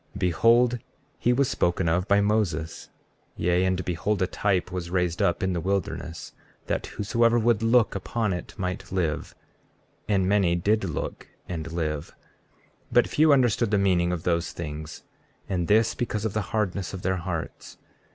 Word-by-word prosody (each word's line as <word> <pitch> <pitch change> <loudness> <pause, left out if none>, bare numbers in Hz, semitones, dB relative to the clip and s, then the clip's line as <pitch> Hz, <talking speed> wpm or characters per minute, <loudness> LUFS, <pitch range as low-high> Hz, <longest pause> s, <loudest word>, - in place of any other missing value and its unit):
33:19 - - -6
Behold, 115 +7 +3 0.4
he 120 - +2
was 135 +2 +2
spoken 85 -3 0
of 90 +4 +1
by 100 0 +4
Moses; 100 -7 -1 0.5
yea, 90 +1 +2
and 95 -1 0
behold 90 +4 -1
a 95 - +2
type 95 -1 0
was 90 -2 -4
raised 90 -1 0
up 85 - +1
in 95 -1 +1
the 85 - -2
wilderness, 90 -3 -3 0.3
that - - -2
whosoever 115 +3 +1
would 115 -1 +2
look 115 0 +3
upon 105 +1 -1
it 90 - -6
might 90 0 -4
live. 85 -5 -2 0.7
And 95 -3 +2
many 95 -4 +3
did 105 +4 +1
look 80 -7 -5 0.2
and 80 -2 -5
live. 80 -3 -3 0.8
33:20 - - -10
But - - +5
few 155 0 +4
understood 120 -5 +3
the 105 - +2
meaning 90 -3 +2
of 85 -2 -3
those 85 -1 0
things, 80 -1 -7 0.4
and 90 -3 -1
this 110 +2 +4
because 110 -3 -3
of 110 - -1
the 110 - 0
hardness 100 -3 -2
of 90 - -8
their 95 +1 0
hearts. 85 -2 -6
95 Hz, 170 wpm, -26 LUFS, 85-105 Hz, 0.8 s, But